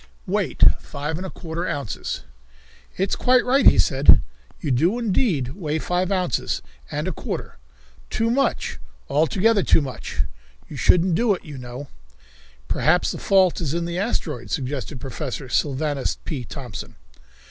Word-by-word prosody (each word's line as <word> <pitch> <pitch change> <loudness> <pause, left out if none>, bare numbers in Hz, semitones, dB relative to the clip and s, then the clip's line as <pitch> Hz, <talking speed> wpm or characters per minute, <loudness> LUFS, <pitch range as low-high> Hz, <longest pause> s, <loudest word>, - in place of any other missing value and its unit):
Weight, - - +1 0.2
Five 150 +3 -4
and 190 +2 -4
a - - -6
Quarter 170 +1 -5
Ounces. 140 -9 -3 0.7
"It's 190 +1 +1
quite 250 0 +3
right," 260 +1 +4
he - - +8
said. 135 -3 +6 0.4
"You 145 - -2
do 165 - +2
indeed 195 - +1
weigh 155 -1 -3
five 180 +4 -1
ounces 180 -8 0 0.3
and - - -3
a - - 0
quarter. - - -5 0.5
Too 225 +1 0
much; 265 - 0 0.3
altogether 195 +8 +3
too - - +4
much," 130 -7 -5
he - - -10
added. 70 +4 0 0.4
"You - - -7
shouldn't 180 0 +4
do 210 +4 +3
it, - - -12
you 145 -4 -8
know." 125 +3 -7 0.8
"Perhaps 175 +4 +2
the - - -6
fault 190 -3 +3
is 155 -1 -1
in 170 0 -1
the 170 +1 -3
asteroid," 160 - -2
suggested 135 0 -3
Professor 135 0 -5
Sylvanus 145 +1 0
P. 135 -6 -4
Thompson. 125 -6 -8
160 Hz, 155 wpm, -23 LUFS, 135-190 Hz, 0.8 s, he